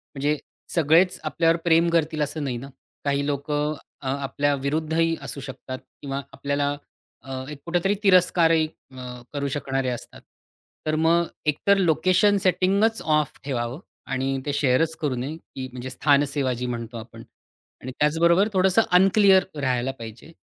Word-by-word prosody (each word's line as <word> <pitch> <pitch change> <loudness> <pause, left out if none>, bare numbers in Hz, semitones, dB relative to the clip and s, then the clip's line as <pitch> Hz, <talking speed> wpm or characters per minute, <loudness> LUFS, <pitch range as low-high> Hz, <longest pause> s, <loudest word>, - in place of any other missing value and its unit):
म्हणजे 145 +2 0 0.4
सगळेच 170 +3 +4
आपल्यावर 165 +1 +2
प्रेम 165 0 +4
करतील 160 -2 0
असं 150 +1 -2
नाही 130 -4 -2
ना. 135 +3 -8 0.4
काही 140 0 +1
लोकं 145 +1 -1 0.3
अ, 135 - -6
आपल्या 140 +1 0
विरुद्धही 160 +4 0
असू - - -5
शकतात 130 -1 -7 0.2
किंवा 140 0 -3
आपल्याला 140 0 -1 0.5
अ, 130 -1 -6
एक 150 -2 -8
कुठेतरी 175 +4 +1
तिरस्कारही 170 -4 +4 0.2
अ, 125 -1 -8
करू 140 -1 -2
शकणारे 135 -2 -1
असतात. 120 - -7 0.6
तर 155 0 0
मग 165 +2 +3 0.2
एक 150 -1 +1
तर 200 0 +6
लोकेशन 185 +3 +3
सेटिंगच 195 +5 +2
ऑफ 150 -2 0
ठेवावं 125 -1 -3 0.3
आणि 135 +1 -1
ते 145 - -1
शेअरच 145 +3 +2
करू 145 -4 0
नये, 130 +6 -4
की 130 -5 -8
म्हणजे 125 +1 -6
स्थान 140 +2 +3
सेवा 140 -2 -1
जी 125 +1 -4
म्हणतो 120 -1 -5
आपण. 115 0 -10 0.6
आणि 130 - -6
त्याचबरोबर 170 +6 +4
थोडंसं 190 +3 +4
अनक्लिअर 190 +1 +6 0.2
राहायला 130 -1 0
पाहिजे. 115 +7 -10
145 Hz, 150 wpm, -24 LUFS, 135-165 Hz, 0.6 s, तर